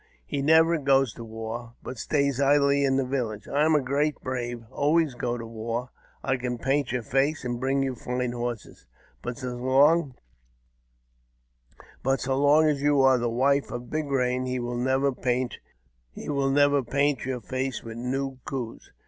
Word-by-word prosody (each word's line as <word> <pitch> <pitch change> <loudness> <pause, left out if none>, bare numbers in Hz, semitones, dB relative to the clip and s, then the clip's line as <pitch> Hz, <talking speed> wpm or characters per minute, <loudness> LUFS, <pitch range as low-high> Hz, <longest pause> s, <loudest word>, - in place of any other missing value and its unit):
He 140 - -3
never 160 +3 +5
goes 135 -4 +3
to 115 - -9
war, 115 +1 -7
but 125 - -7
stays 140 -1 0
idly 140 0 +4
in 135 -1 +2
the 135 - +1
village. 120 -6 -3
I 145 +1 +1
am 160 0 +4
a 145 - +2
great 145 +3 0
brave, 120 -2 -4
and 110 - -23
always 150 0 +2
go 120 0 -2
to 115 - -6
war. 115 +2 -4 0.3
I 135 -1 +1
can 125 -1 -3
paint 135 +2 0
your 125 -1 -2
face, 135 +4 0
and 120 -1 -2
bring 135 +2 +1
you 135 -1 -1
fine 125 0 -3
horses; 120 -2 -5 0.3
but 120 0 -5
so 125 -3 -5
long 135 +3 +3 2.5
as 145 -2 +1
you 145 -1 +3
are 130 -1 +5
the 120 0 0
wife 135 +4 +2
of 120 0 -7
Big 155 0 -1
Eain, 130 -2 0
he 125 0 -1
will 120 0 -3
never 130 +3 +1
paint 125 -1 -2 0.6
your 140 -2 +1
face 130 +3 -3
with 115 0 -8
new 130 +2 -3
coos." 125 -4 -6
130 Hz, 160 wpm, -26 LUFS, 120-140 Hz, 2.5 s, never